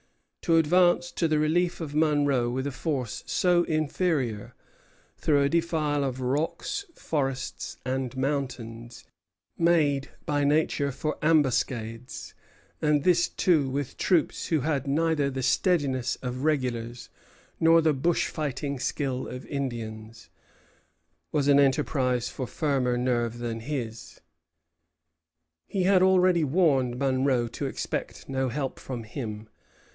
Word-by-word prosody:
To 165 -1 +3
advance 175 +2 +3
to 165 - 0
the 155 -1 +1
relief 170 +4 +1
of 155 -4 -5
Monro 145 -5 +2
with 130 +2 -2
a 140 - -2
force 130 -5 -3
so 175 -1 +3
inferior, 155 - -1 0.6
through 145 -2 +2
a 140 - +2
defile 155 -3 0
of 130 -1 -3
rocks, 150 - -2
forests, 135 -3 -3
and 130 0 -2
mountains, 125 -4 -4 0.5
made 155 -5 +2 0.2
by 145 -1 0
nature 145 -1 +1
for 150 +4 -3
ambuscades, 125 -6 0 0.5
and 150 -2 +2
this 175 -1 +3
too 155 -7 +2
with 140 0 -3
troops 175 -5 +1
who 160 -4 +1
had 140 -1 -1
neither 150 0 +1
the 130 -1 -4
steadiness 135 -5 +1
of 125 +1 -4
regulars 125 -6 -1 0.5
nor 165 0 +6
the 160 -2 +3
bush 165 +5 +1
fighting 140 -2 -3
skill 130 -1 -2
of 125 - -7
Indians, 115 -5 -5 1.0
was 145 -2 +1
an 140 0 +6
enterprise 135 -3 +1
for 130 - -5
firmer 130 -5 0
nerve 120 -2 0
than 120 -1 -4
his. 115 -3 -6 1.5
He 190 - -1
had 185 0 +4
already 185 -2 +4
warned 135 -6 +2
Monro 130 -2 +1
to - - -4
expect - - -4
no 130 -1 -1
help 135 +1 -3
from 125 -3 -6
him. 110 -2 -6
140 Hz, 125 wpm, -27 LUFS, 125-155 Hz, 1.5 s, nor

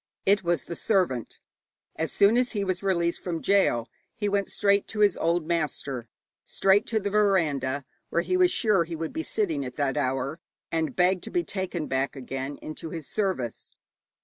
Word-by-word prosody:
It 200 0 +4
was 170 -3 +1
the 170 - -6
servant. 170 - 0 0.6
As 160 +1 -2
soon 200 +3 +5
as 250 0 +1
he 205 -2 0
was 185 -1 -1
released 170 -3 0
from 170 -3 -2
gaol, 175 -14 +2 0.3
he 205 - -1
went 200 -1 +1
straight 200 -1 +2
to 210 - -3
his 205 -3 +5
old 170 0 +1
master, 150 -7 -2 0.4
straight 195 +1 +3
to 225 - +1
the 200 -1 -3
veranda 150 -10 +2 0.2
where 170 - +1
he 365 - 0
was 365 -1 +5
sure 210 - +3
he 165 0 -6
would 160 0 -4
be 320 - -2
sitting 180 - -1
at 125 - -6
that 140 -2 0
hour, 135 +3 -1 0.3
and 160 -1 -1
begged 180 0 +3
to - - -6
be 350 -1 0
taken 185 - -3
back 135 +2 -1
again 135 +1 -5
into 155 +1 -6
his 160 -2 -6
service. 185 - -2
170 Hz, 185 wpm, -27 LUFS, 145-200 Hz, 0.6 s, soon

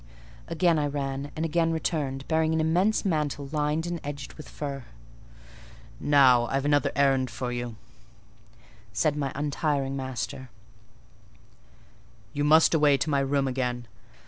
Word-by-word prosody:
Again 165 -1 +2
I 145 - +1
ran, 140 0 -3
and 160 - -2
again 165 +1 +1
returned, 145 -4 -2
bearing 160 0 +1
an - - +1
immense 180 +8 +2
mantle 150 -5 -1
lined 150 +1 0
and 175 -1 -3
edged 145 -1 -6
with 155 - -11
fur. 140 -3 -5 1.1
"Now, 130 -5 +5
I've 135 +2 -1
another 145 0 +2
errand 135 -2 +2
for 125 0 -4
you," 120 -1 -4 1.2
said 140 +8 +1
my 140 -2 -2
untiring 145 -1 -1
master; 130 0 -5 1.8
"you 145 - -1
must 155 +3 +5
away 150 -3 +4
to 150 +4 -1
my 140 - +3
room 135 0 +1
again. 125 -2 -2
145 Hz, 135 wpm, -27 LUFS, 135-155 Hz, 1.8 s, Now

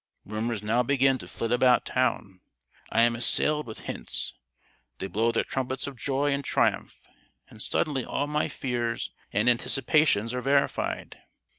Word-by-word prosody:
"Rumours 110 +1 -3
now 115 +4 +2
begin 135 +1 +2
to - - -10
flit 115 - -4
about 125 0 +4
town: 115 -7 -1 0.5
I 115 - +4
am 120 0 +3
assailed 150 +5 +1
with 110 - -8
hints; - - -2 0.6
they - - -4
blow 115 +4 +1
their 115 - +1
trumpets 130 0 -3
of 140 - -6
joy 140 +4 0
and 140 0 -1
triumph; - - 0 0.5
and - - -6
suddenly 140 -4 +1
all 145 - -2
my 150 +1 -1
fears 120 -3 -3 0.2
and 105 +4 +1
anticipations 125 -1 +3
are 125 - -2
verified! 140 +2 0
125 Hz, 150 wpm, -27 LUFS, 115-140 Hz, 0.6 s, about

